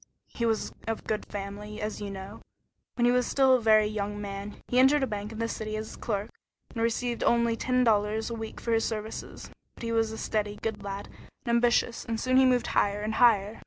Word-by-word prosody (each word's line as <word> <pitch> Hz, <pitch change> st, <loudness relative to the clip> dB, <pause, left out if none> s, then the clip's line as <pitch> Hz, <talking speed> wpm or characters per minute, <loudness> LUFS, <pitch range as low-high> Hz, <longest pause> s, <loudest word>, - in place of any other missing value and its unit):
He 235 Hz, -, -1 dB
was 225 Hz, -1 st, -1 dB
of 225 Hz, -1 st, -2 dB
good 215 Hz, -, -3 dB
family, 205 Hz, +1 st, -6 dB
as 215 Hz, 0 st, -4 dB
you 205 Hz, -, -4 dB
know. 190 Hz, -1 st, -8 dB, 0.5 s
When 240 Hz, -, +2 dB
he 245 Hz, -, +5 dB
was 250 Hz, -1 st, +2 dB
still 265 Hz, -1 st, +4 dB
a 255 Hz, -, +4 dB
very 215 Hz, -1 st, +5 dB
young 205 Hz, -1 st, -3 dB
man, 200 Hz, 0 st, -6 dB
he 250 Hz, -, +2 dB
entered 270 Hz, +2 st, +5 dB
a -, -, +4 dB
bank 210 Hz, -2 st, -5 dB
in 220 Hz, -, -8 dB
the 230 Hz, 0 st, -1 dB
city 215 Hz, -1 st, -4 dB
as 215 Hz, 0 st, -6 dB
clerk, 210 Hz, -1 st, -3 dB, 0.4 s
and 230 Hz, -, -4 dB
received 235 Hz, +1 st, 0 dB
only 235 Hz, -1 st, +3 dB
ten 255 Hz, +2 st, +1 dB
dollars 215 Hz, 0 st, +1 dB
a -, -, -2 dB
week 225 Hz, -1 st, -6 dB
for 235 Hz, -, -3 dB
his 225 Hz, 0 st, +3 dB
services, 220 Hz, -1 st, -5 dB, 0.2 s
but -, -, -11 dB
he 230 Hz, -, -2 dB
was 225 Hz, -1 st, +1 dB
a 220 Hz, -, -6 dB
steady, 210 Hz, -2 st, -1 dB
good 225 Hz, -2 st, -2 dB
lad, 200 Hz, 0 st, -5 dB, 0.4 s
and -, -, -3 dB
ambitious, 235 Hz, 0 st, +2 dB
and 225 Hz, -1 st, -3 dB
soon 255 Hz, +2 st, +2 dB
he 265 Hz, -, +7 dB
moved 250 Hz, -1 st, +3 dB
higher 205 Hz, 0 st, +2 dB
and 215 Hz, +1 st, -2 dB
higher. 215 Hz, -3 st, +4 dB
220 Hz, 225 wpm, -28 LUFS, 210-235 Hz, 0.5 s, he